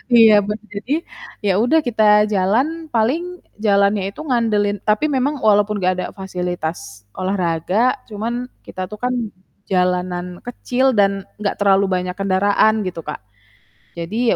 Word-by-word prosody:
iya 225 -2 +8
be 210 - -2 0.2
jadi, 220 +8 -3 0.5
ya 195 - +3
udah 320 +6 +4
kita 220 -2 +1 0.3
jalan 255 - +1
paling 330 +11 0 0.2
jalannya 200 0 +3
itu - - -9
ngandelin 210 -5 +1
tapi 210 +8 +2
memang 280 +2 0
walaupun 210 0 +3
gak 185 0 +2
ada 185 - -2
fasilitas 175 - -5
olahraga, 185 +5 0
cuman 220 +3 -3 0.3
kita 185 - -7
tuh 210 - -8
kan 250 0 +1 0.6
jalanan 180 -1 0 0.2
kecil 250 +2 -1
dan 195 -1 +2 0.2
enggak 200 - -1
terlalu 200 0 +4
banyak 180 0 -2
kendaraan 200 +3 +2
gitu 170 -2 -5
Kak, 150 - -6 0.8
jadi 220 +8 0
205 Hz, 135 wpm, -19 LUFS, 185-230 Hz, 0.8 s, iya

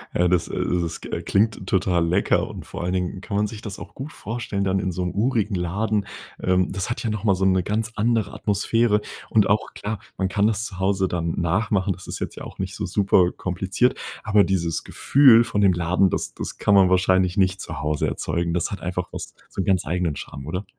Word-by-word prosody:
Ja, 90 - +3
äh, - - +3
das 90 -1 +2
äh, - - -6 0.3
das, 85 -1 -3
äh, - - -4
klingt 105 -2 +1
total 90 -3 +2
lecker 90 +4 +2
und - - -8
vor - - -6
allen 90 +1 -1
Dingen 90 +1 -2
kann 100 -1 -3
man 105 +1 +2
sich 105 -1 -9
das 105 -4 -7
auch - - -10
gut 140 +4 -7
vorstellen 110 -3 -3
dann 95 0 +1
in 95 -1 -1
so'm 90 +1 -2
urigen 110 -1 +1
Laden. 100 +4 -1 0.4
Ähm, 90 0 +2
das 95 +2 -3
hat 120 - -3
ja 115 - -1
noch 105 -1 -3
mal 100 -3 +3
so 95 +1 0
'ne 95 -1 +3
ganz 110 +3 -1
andere 115 0 +1
Atmosphäre 105 +1 +1 0.3
und 110 -2 +4
auch 105 +2 0
klar, 105 0 -4 0.2
man 95 - +1
kann 100 +2 +2
das 110 0 -1
zu 95 -5 -8
Hause 95 0 +1
dann 85 -2 -2
nachmachen, 95 +2 +1
das 90 +1 -13
ist - - -5
jetzt - - -4
ja - - -8
auch - - -10
nicht - - -3
so - - -3
super 95 -3 +3
kompliziert, 95 +7 0 0.3
aber 105 -1 +4
dieses 85 -4 -1
Gefühl 130 -5 +5
von 115 -3 -1
dem 95 -2 +5
Laden, 90 +3 +2
das - - -3
das - - -6
kann 100 - +2
man 95 -2 +6
wahrscheinlich 95 0 +3
nicht 95 -1 +2
zu 80 0 -6
Hause 75 -1 0
erzeugen. 85 0 -2
Das 85 -1 -1
hat 100 - -5
einfach 90 0 -3
was - - -7 0.2
so - - -3
'n - - -3
ganz 95 -3 +2
eigenen 85 -1 -1
Charme, 70 0 -8
oder? 90 +5 -3
95 Hz, 230 wpm, -23 LUFS, 90-105 Hz, 0.4 s, man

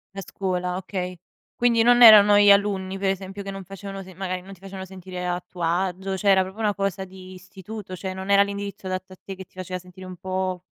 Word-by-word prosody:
La 195 - -5
scuola, 180 -1 -3
okay. 185 -1 -5 0.4
Quindi 235 -1 +3
non 245 +1 +6
erano 210 -2 +9
gli 205 0 +7
alunni, 195 -1 +1
per 195 -1 +1
esempio, 195 +1 -4
che 195 - -7
non 195 -1 -6
facevano 195 +1 -8
se 185 0 -13
magari 185 0 -4
,non 195 +2 -12
ti 180 - -16
facevano 190 -1 -8
sentire 185 -1 -8
a 180 0 -2
tuo 175 -2 -8
agio, 185 +3 -1
cioè, 200 - +1
era 190 -1 +6
proprio 190 +4 -8
una 210 -2 +1
cosa 195 -1 -2
di 185 0 -12
istituto, 190 +1 -9
cioè, 185 +1 -5
non 190 +1 -7
era 200 0 +6
l'indirizzo 200 -1 -6
adatto 185 0 -4
a - - -12
te 195 - -7
che 190 0 -10
ti - - -36
faceva 185 0 -5
sentire 180 +1 -13
un 185 0 -8
po', 185 -1 -3
190 Hz, 235 wpm, -24 LUFS, 185-200 Hz, 0.4 s, erano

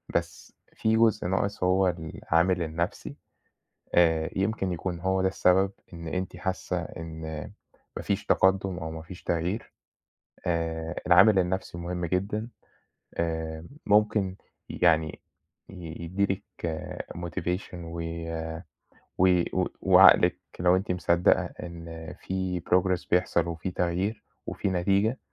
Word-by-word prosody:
بس - - -3 0.2
في 110 0 +1
جزء 115 -5 +3
ناقص 95 +1 -1
هو 95 +1 +3
العامل 85 +1 0
النَفْسي، 85 +2 -3 0.8
آآ 80 -2 +4
يمكن 95 -1 0
يكون 90 0 -3
هو 95 +1 +1
ده 95 - +3
السبب 95 +1 +3 0.2
إن 85 -1 -7
أنتِ 90 +1 -3
حاسّة 95 +1 -2
إن 80 -1 -8 0.8
ما - - -5
فيش - - -1
تقدُّم 95 -1 +2
أو 80 -2 -5
ما 80 - -6
فيش 85 +3 -11
تغيير، 85 +6 -2 0.7
آآ 80 -1 -1
العامل 95 +3 +7
النَفْسي 90 -1 -2
مهم 85 0 -3
جدًا. 100 +6 -1 0.7
آمم 80 -1 -2 0.2
ممكن 105 -2 +3 0.3
ي - - -6
يعني 80 -3 +3 0.5
ي 85 -3 -8
يدّي 95 +4 0
لِك 95 +1 -3 0.7
motivation 90 +2 -3
وي 85 -1 -5 0.9
وي 90 -1 +4
و - - +2 0.2
وعقلِك - - +7 0.2
لو 90 +1 +4
أنتِ 95 0 -1
مصدَّقة 90 0 +3
إن 85 -2 -8
في 95 -2 -2
progress 90 +1 +1
بيحصل 85 -1 +2
وفي 85 +2 -4
تغيير 90 +5 -1 0.2
وفي - - -3
نتيجة، 100 +6 +1
90 Hz, 125 wpm, -27 LUFS, 85-95 Hz, 0.9 s, العامل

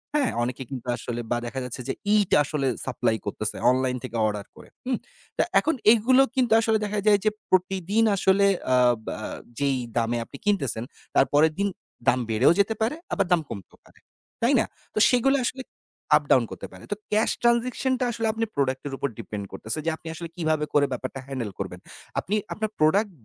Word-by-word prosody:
হ্যাঁ? 280 -4 +2
অনেকে 125 +2 -3
কিন্তু 125 -2 -7
আসলে 120 -1 -5
বা 120 - +2
দেখা 130 +3 -4
যাচ্ছে 125 +1 -6
যে - - 0 0.2
ইট 205 -3 +2
আসলে 140 -1 -1 0.2
সাপ্লাই 115 -3 0
করতেছে 105 +1 -3 0.2
অনলাইন 130 0 0
থেকে 120 -2 -6
অর্ডার 105 -1 -3
করে, - - -14 0.2
হুম? 255 -2 0 0.4
তো - - +3 0.2
এখন 320 - 0 0.2
এগুলো 255 +4 +4
কিন্তু 245 -4 +3
আসলে 220 -1 +2
দেখা 210 0 -2
যায় 205 -1 +6
যে - - +6 0.2
প্রতিদিন 190 +3 +2
আসলে 195 +1 +3 0.3
আ - - +5 0.3
বা - - -3 0.4
যেই 140 -2 +1 0.2
দামে 115 +1 +1
আপনি 140 - -11
কিনতেছেন, 135 - 0 0.3
তার 135 - +6
পরের 155 +2 +5
দিন 200 - +2 0.4
দাম 125 - +4
বেড়েও 115 +9 +5
যেতে 200 +3 +3
পারে, 230 +7 +1 0.2
আবার - - +2
দাম 170 -2 +4
কমতেও 100 -4 -9
পারে। - - -22 0.4
তাই 240 +4 +3
না? - - +2 0.3
তো - - 0
সেগুলো 270 +3 +3
আসলে 260 +1 -3 0.5
আপ - - -4
ডাউন - - +6
করতে - - -7
পারে। - - -13
তো - - +1 0.2
ক্যাশ 215 +2 +3
ট্রান্সেকশন 240 +2 +2
টা 250 - +1
আসলে 225 -1 -1
আপনি 225 0 -1
প্রোডাক্ট 130 -2 0
এর 135 - -6
উপর 140 - -1
ডিপেন্ড 100 -2 -5
করতেছে। 110 +8 -4
যে - - +2
আপনি 165 - -13
আসলে 170 +1 -6
কিভাবে 155 -3 0
করে 145 -1 +5
ব্যাপারটা 130 +2 -4
হ্যান্ডেল 125 -7 -4
করবেন। 90 -2 -5 0.4
আপনি 205 - -2 0.2
আপনার 215 0 -2
প্রোডাক্ট 195 +7 +3
160 Hz, 195 wpm, -25 LUFS, -, 0.5 s, যায়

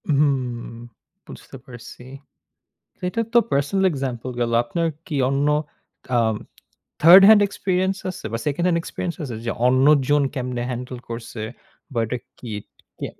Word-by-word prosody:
হুম, 135 -5 0 0.6
বুঝতে - - -11
পারছি। 125 -1 -12 1.1
এটা 230 - -2
তো - - +8
পার্সোনাল 145 +8 +1
এক্সাম্পল 130 -3 -4
গেলো। 115 -1 0
আপনার 165 +8 -1 0.2
কি 155 -5 -3
অন্য 140 +1 +1 0.7
আম 110 -2 +2 0.7
থার্ড 175 +5 +10
হ্যান্ড 215 -1 +8
এক্সপেরিয়েন্স 190 -1 -1
আছে 180 - -10
বা 115 - -1
সেকেন্ড 150 +4 0
হ্যান্ড 170 -2 +2
এক্সপেরিয়েন্স 170 +1 -4
আছে 125 -5 -5
যে, - - 0 0.2
অন্যজন 140 +2 +4
কেমনে 125 -2 -3
হ্যান্ডেল 125 +1 -5
করছে 115 -1 -6 0.5
বা 120 - -2
এটা 125 +3 -3 0.2
কি? 120 - -9 0.5
কি - - -4
135 Hz, 135 wpm, -22 LUFS, 120-170 Hz, 1.1 s, থার্ড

